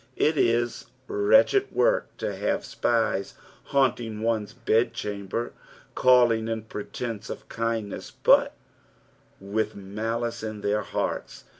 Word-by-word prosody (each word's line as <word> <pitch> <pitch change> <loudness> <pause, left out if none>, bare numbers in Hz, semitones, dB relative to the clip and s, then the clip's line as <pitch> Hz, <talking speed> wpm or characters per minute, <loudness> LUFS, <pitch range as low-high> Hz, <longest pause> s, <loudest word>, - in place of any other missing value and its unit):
It 155 - +3
is 120 -3 +1 0.2
wretched 410 0 +4
work - - +1
to - - -3
have - - -1
spies 115 -4 0 0.3
haunting 120 -5 0
one's 110 -2 0
bedchamber, 115 -2 -1 0.4
calling 120 -3 +4
in 115 -1 -2
pretence 110 +1 -6
of - - -7
kindness, 115 -3 -3
but - - +5 0.8
with 105 +2 -2
malice 115 +4 -3
in 110 -1 -5
their 105 +1 +1
hearts. 95 - -3
115 Hz, 110 wpm, -26 LUFS, 105-120 Hz, 0.8 s, but